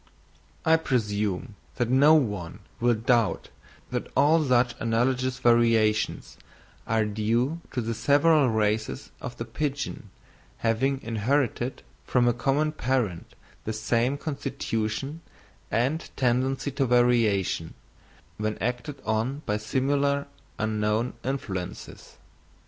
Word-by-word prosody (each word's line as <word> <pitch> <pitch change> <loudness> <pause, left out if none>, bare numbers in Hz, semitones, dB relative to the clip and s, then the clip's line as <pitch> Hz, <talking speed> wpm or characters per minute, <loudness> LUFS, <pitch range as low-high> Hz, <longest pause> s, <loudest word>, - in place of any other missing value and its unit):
I 160 0 +6
presume 105 - -1 0.2
that 120 -2 0
no 145 +4 +6
one 105 - -1 0.2
will 120 0 +3
doubt 115 0 +1 0.4
that - - -3
all 155 +2 +5
such 125 -3 +3
analogous 125 +3 0
variations 115 -2 +2 0.5
are 110 -1 +2
due 115 +9 0
to 125 - -2
the 115 0 -2
several 145 +4 +4
races 110 - -1
of - - -6
the - - -4
pigeon 145 -7 -4 0.6
having 130 +4 +1
inherited 120 +3 -1 0.2
from 125 -1 +2
a 120 - +4
common 140 +5 +1
parent 120 - -2 0.3
the 110 - -3
same 115 +5 0
constitution 135 -1 -3 0.5
and 130 +8 0
tendency 130 +2 +1
to 135 0 0
variation, 115 -9 +2 0.6
when 105 +1 -2
acted 125 +4 -3
on 115 +7 -1
by 105 - 0
similar 140 +5 0 0.3
unknown 110 +2 0
influences. 105 -9 -5
120 Hz, 110 wpm, -26 LUFS, 110-135 Hz, 0.6 s, I